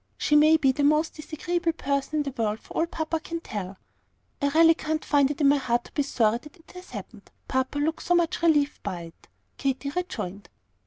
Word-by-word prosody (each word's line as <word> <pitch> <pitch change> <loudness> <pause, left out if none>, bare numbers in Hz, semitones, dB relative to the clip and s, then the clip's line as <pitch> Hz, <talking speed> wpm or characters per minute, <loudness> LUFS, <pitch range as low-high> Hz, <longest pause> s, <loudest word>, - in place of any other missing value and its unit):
She 300 - +2
may 310 +2 +7
be 270 -4 +3
the 285 +2 -1
most 305 +2 +3
disagreeable 330 +2 -2
person 280 -1 -2
in 300 - +2
the 280 - -4
world 220 -1 -1
for - - -14
all 325 - +1
papa 325 -1 -2
can 335 +1 -5
tell." 195 - -6 0.6
"I 285 - +2
really 325 +3 +6
can't 315 -1 -3
find 285 -2 +3
it 295 +1 -4
in 285 - +5
my 285 +1 +5
heart 240 -3 0
to - - -15
be 290 - 0
sorry 235 -5 +1
that 300 +2 -15
it 330 - -19
has 360 0 -12
happened, - - -9 0.2
papa 260 +2 -1
looks 310 +2 -1
so 355 - +4
much 345 0 +1
relieved 295 -4 +2
by 175 -2 -4
it," 165 0 -13 0.3
Katy 275 +1 -2
rejoined. 210 - -5
295 Hz, 215 wpm, -26 LUFS, 265-320 Hz, 0.6 s, may